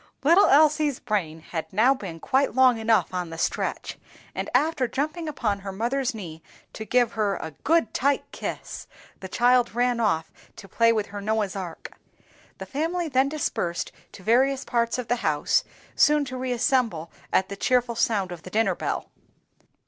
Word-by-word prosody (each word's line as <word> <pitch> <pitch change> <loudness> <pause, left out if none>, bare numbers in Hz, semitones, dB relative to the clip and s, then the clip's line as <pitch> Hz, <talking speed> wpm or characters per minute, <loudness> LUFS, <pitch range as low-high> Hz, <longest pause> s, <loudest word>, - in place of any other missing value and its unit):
Little 340 +8 +6
Elsie's 300 -1 +4
brain 165 -7 -2
had 160 0 -6
now 225 +7 +4
been 190 -10 -8
quite 270 - +1
long 255 -3 +5
enough 220 -3 +2
on 180 -2 -3
the 165 - -8
stretch, - - -2 0.3
and - - -4
after 275 0 +2
jumping 310 +6 -3
upon 215 -9 -1
her 195 0 -6
mother's 245 +5 -1
knee 165 -6 -8 0.3
to 220 - -7
give 245 0 +2
her 210 -3 0
"a 160 - -6
good 325 -8 +2
tight 280 +1 +1
kiss," - - -6 0.3
the 190 - -7
child 245 +1 +3
ran 245 0 +1
off 165 -8 0 0.2
to 195 - -11
play 230 +3 +3
with 215 -2 0
her 205 - -5
Noah's 210 -1 -1
Ark. 180 -4 -7 0.7
The - - -7
family 330 +4 -2
then 265 0 +2
dispersed 175 - -2 0.2
to 190 - -12
various 260 +5 +2
parts 235 0 0
of 250 -3 -4
the 245 - +1
house, 155 -9 +1 0.3
soon 300 -1 +4
to 255 -1 -6
reassemble 245 -8 0 0.2
at 190 - +2
the 200 - -5
cheerful 245 +3 +1
sound 205 -5 0
of 175 -2 -8
the 185 - -10
dinner 210 -1 +1
bell. - - -4
235 Hz, 170 wpm, -25 LUFS, 195-265 Hz, 0.7 s, Little